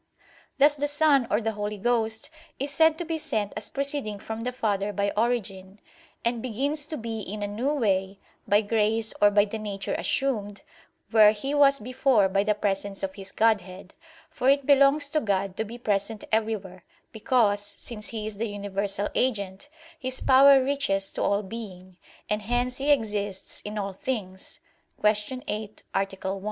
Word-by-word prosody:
Thus 285 +2 +6
the 290 0 -1
Son, 290 -4 +3
or 210 - +2
the 225 0 -1
Holy 210 0 -4
Ghost 225 +4 -1 0.3
is 275 +2 -3
said 320 +1 +4
to 345 - -4
be 325 0 -2
sent 210 -8 -2
as 215 - -3
proceeding 275 -6 0
from 220 +2 -6
the 250 +2 -2
Father 210 -4 -1
by 200 0 -1
origin; 205 -4 -2 0.5
and 235 -1 0
begins 280 +6 -1
to 310 -1 -3
be 225 -2 -4
in 205 +2 -5
a - - -1
new 230 +8 -1
way, 195 -8 0 0.3
by 205 +1 +4
grace 220 +1 +1
or 205 - +7
by 205 0 +4
the 220 +1 -5
nature 200 -2 -4
assumed, 205 -7 -1 0.5
where 215 -2 +7
He 270 +7 -4
was 280 -1 +5
before 255 -2 +2
by 195 +1 +2
the 210 0 +1
presence 200 -1 -2
of 190 -1 -2
His 195 -1 -9
Godhead; 195 -4 0 0.4
for 255 - +1
it 280 0 +3
belongs 280 +1 +5
to 305 +1 +1
God 195 -3 -1
to 220 - 0
be 225 +2 -8
present 210 -1 -2
everywhere, 210 -5 -2 0.3
because, 220 -2 +2 0.2
since 215 -3 -7
He 220 -2 -5
is 215 -2 -5
the 230 +2 -1
universal 200 0 -2
agent, 200 -1 -1 0.3
His 260 0 -3
power 270 0 +6
reaches 255 -9 -1
to - - -4
all 200 +1 +1
being, 185 -4 -9 0.3
and 210 0 -1
hence 245 +4 -1
He 280 +2 -1
exists 205 -7 -1
in 210 +1 -6
all 200 -1 -3
things 190 -4 -5 0.4
(Q. 210 +5 +1
8, 215 -4 -5
A. 195 0 +1 0.2
1). 195 - -4
215 Hz, 175 wpm, -26 LUFS, 200-255 Hz, 0.5 s, or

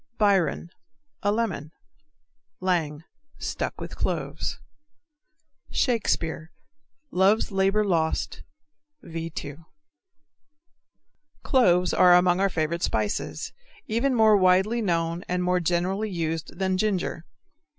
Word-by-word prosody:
Biron 195 -4 +2 0.5
A 205 - +2
lemon. 200 -9 -2 0.9
Lang 165 -5 -1 0.3
Stuck - - -4
with - - -7
cloves. - - -3 1.1
Shakespeare, 175 - -1 0.6
Love's 195 +5 +3
Labor 195 +2 +2
Lost, 165 -5 -1 0.6
V. 165 0 -5
2. 145 0 -7 1.8
Cloves 180 - +3
are 180 -1 +6
among 180 0 +4
our 195 0 +3
favorite 170 0 -2
spices, 105 - -2 0.3
even 245 +4 0
more 220 -2 +6
widely 190 +5 +3
known 170 -2 -1
and 180 0 0
more 180 0 +2
generally 180 +5 0
used 165 -3 -3
than 190 0 0
ginger. 190 -5 -1
180 Hz, 100 wpm, -25 LUFS, 165-205 Hz, 1.8 s, are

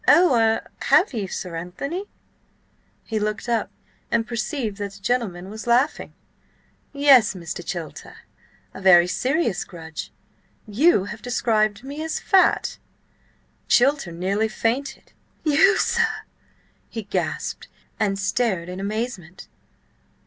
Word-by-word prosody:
Oh–er–have 265 - +3
you, 210 -5 -2
Sir 180 -1 -5
Anthony?" 275 - -5 1.0
He 220 -1 -2
looked 210 +2 -3
up 235 -2 0 0.4
and 230 -1 +1
perceived 235 -2 -3
that 200 -1 -5
the 200 - -13
gentleman 195 -4 -2
was 220 +2 -8
laughing. 250 +6 +1 0.8
"Yes, 275 -7 +5
Mr. 175 -1 -6
Chilter, 170 -3 -7 0.6
a - - -9
very 175 -2 +7
serious 250 - 0
grudge: 160 -3 -8 0.6
you 220 - +3
have 215 - -8
described 220 -3 0
me 285 +3 -6
as 320 - -2
fat!" 385 -3 +2 0.9
Chilter 270 -7 +3
nearly 195 +6 0
fainted. 235 +6 -3 0.3
"You, 330 +7 +4
sir," 460 -1 +1 0.7
he 225 - -5
gasped, 200 - -3 0.3
and 200 -3 +1
stared 200 -3 -1
in 180 +1 -6
amazement. 200 -4 -5
220 Hz, 115 wpm, -23 LUFS, 190-260 Hz, 1.0 s, very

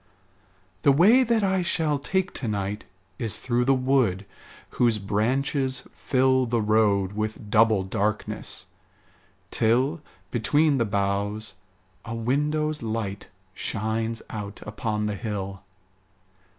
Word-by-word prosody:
The 140 - +5
way 200 - +6
that 230 -3 +2
I 190 -1 +2
shall 160 -4 0
take 190 +6 -1
to 125 - -4
night 105 0 -3 0.3
Is 115 -3 -2
through 120 0 0
the 135 +1 +4
wood 125 -7 +1 0.5
whose 120 -3 +2
branches 130 +7 0
fill 130 -1 +2
The 120 0 +1
road 105 -3 +2
with 110 0 -4
double 110 -3 +4
darkness, 105 +2 -2 0.9
till, 130 +8 +2 0.3
Between 145 +5 +2
the 115 - +2
boughs, 100 +1 -1 0.5
a 115 - -5
window's 150 +6 0
light 110 -3 -3 0.3
Shines 110 +3 -2
out 105 -2 -6
upon 105 0 -2
the 105 - -1
hill. 100 -3 -4
115 Hz, 115 wpm, -25 LUFS, 105-135 Hz, 0.9 s, way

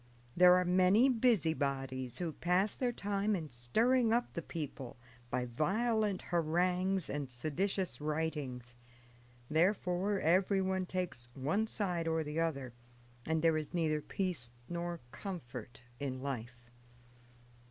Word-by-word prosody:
There 180 0 +8
are 180 0 +3
many 185 +8 +5
busybodies 140 - +1
who 170 -3 -3
pass 180 +6 +1
their 250 -2 0
time 205 -1 0
in 160 -5 -5
stirring 225 - +2
up 240 +1 +1
the 170 - -3
people 145 -7 -6 0.3
by 125 0 -1
violent 205 - 0
harangues 180 +2 +1
and 145 -2 -3
seditious 155 +9 -2
writings; 150 -6 -3 0.7
therefore 185 +4 +1
everyone 190 +2 +2
takes 180 -11 -4
one 175 +12 0
side 180 -7 -1
or 160 0 +1
the 150 +2 -3
other, 140 -7 -1 0.5
and 160 0 +1
there 165 -1 +4
is 155 +1 -4
neither 155 -3 +1
peace 170 -9 -3 0.2
nor 170 -1 -4
comfort 125 - -7 0.2
in 135 -2 -3
life. 120 -3 -6
170 Hz, 120 wpm, -34 LUFS, 140-190 Hz, 0.7 s, There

